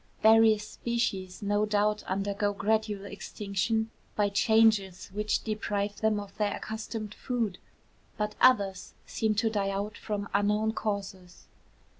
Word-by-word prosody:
Various 220 -1 +6
species 210 -6 -2
no 205 +1 +1
doubt 210 0 +1
undergo 200 +1 -1
gradual 210 -1 0
extinction 210 +2 -2 0.2
by 205 -1 +2
changes 200 -3 +3
which 210 +1 0
deprive 205 -2 -2
them 220 -1 +1
of 205 -1 -9
their 210 -1 0
accustomed 220 -1 -5
food; 230 -8 -2 0.6
but 210 0 -1
others 200 -7 +3
seem 220 -1 0
to 220 +2 +1
die 200 -2 0
out 200 +1 -3
from 205 -2 -3
unknown 210 +2 +2
causes. 195 -5 -5
210 Hz, 125 wpm, -29 LUFS, 200-220 Hz, 0.6 s, Various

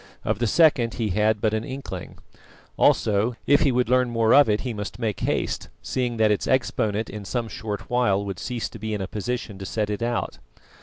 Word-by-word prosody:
Of 110 -1 0
the 120 - +1
second 130 -5 +4
he 115 -3 -1
had 105 +2 +2
but 110 -1 +1
an 110 0 -1
inkling. 130 -9 -7 0.6
Also, 110 +3 +2
if 145 - +4
he 140 - +4
would 125 0 +1
learn 125 0 +3
more 115 -1 +3
of 145 -4 +7
it 105 0 +1
he 125 -3 -3
must 105 -1 -6
make 110 -4 -2
haste, - - -2
seeing 125 -2 -2
that 110 -1 +4
its 105 - 0
exponent 110 -4 0
in 105 -1 -7
some 120 +3 -2
short 105 -2 -5
while 100 -5 +1
would 100 -2 -5
cease 120 -2 -3
to 115 - -11
be 110 0 -3
in 105 - -4
a 95 - -3
position 105 -1 -4
to 95 - -6
set 105 0 -1
it 105 - -3
out. 120 0 -2
110 Hz, 215 wpm, -24 LUFS, 105-125 Hz, 0.6 s, of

